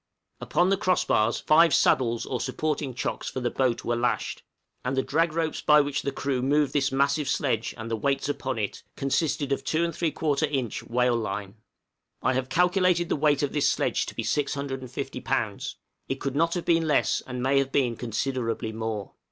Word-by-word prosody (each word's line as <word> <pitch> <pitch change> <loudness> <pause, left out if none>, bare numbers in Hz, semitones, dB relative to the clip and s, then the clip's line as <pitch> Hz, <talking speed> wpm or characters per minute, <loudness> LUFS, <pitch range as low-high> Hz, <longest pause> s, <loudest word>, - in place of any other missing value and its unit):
Upon 180 +2 +1
the 195 - +3
cross 185 -2 +1
bars 110 +2 +2
five 165 +2 +5
saddles 120 -3 +2
or 125 - -3
supporting 150 -4 -2
chocks - - -3
for - - -4
the 125 -1 -1
boat 130 -3 0
were 120 - +1
lashed, 120 +1 -1 0.4
and 130 +1 -2
the 130 - +2
drag 165 +2 +1
ropes 160 -1 -1
by 150 0 +6
which 145 -1 0
the 140 - -2
crew 135 -2 -2
moved 145 +2 +2
this 145 -1 +1
massive 140 +1 +1
sledge, 120 -6 0
and 115 0 -6
the - - +1
weights 135 +5 0
upon 135 -3 -2
it, 105 -2 -3
consisted 140 +1 0
of 135 0 0
2 165 +4 +1
3/4 155 -2 0
inch 130 -6 -2
whale 125 0 +1
line. 105 -2 -4 0.7
I 130 - +2
have 130 0 -2
calculated 180 +2 +2
the - - +2
weight 145 -1 +2
of 145 - -1
this 150 - +3
sledge - - 0
to - - -7
be - - -2
650 140 -3 -3
lbs.; - - -2 0.3
it 135 - 0
could 135 0 -3
not 165 +3 +2
have 175 - -3
been 165 -1 +2
less, 150 - +2
and 125 -1 -4
may 135 +1 +3
have 135 0 -1
been 125 -5 +1
considerably 115 -1 -2
more. 110 -2 -4
135 Hz, 195 wpm, -26 LUFS, 125-150 Hz, 0.7 s, by